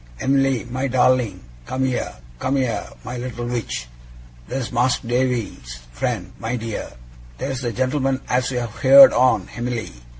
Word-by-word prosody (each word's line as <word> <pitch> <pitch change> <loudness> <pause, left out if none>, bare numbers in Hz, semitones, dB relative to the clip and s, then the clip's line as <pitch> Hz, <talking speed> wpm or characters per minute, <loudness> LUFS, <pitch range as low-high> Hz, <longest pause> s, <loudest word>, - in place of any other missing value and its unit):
Em'ly, 135 -2 +2
my 130 +2 -1
darling, 125 -6 +2 0.3
come 130 0 -1
here! 130 -1 -2 0.2
Come 135 - 0
here, 120 -6 -1 0.2
my 125 0 -5
little 120 -1 -5
witch! 115 - -3 0.6
There's 130 -3 -3
Mas'r 125 0 +1
Davy's 120 - -1
friend, - - -3
my 115 +2 -2
dear! 115 -2 -5 0.4
There's 130 - -3
the 120 -2 -2
gent'lman 130 +1 0
as 125 0 +1
you've 120 -4 -4
heerd 275 -1 +9
on, 115 -7 +3
Em'ly. 120 - -3
125 Hz, 140 wpm, -21 LUFS, 115-130 Hz, 0.6 s, heerd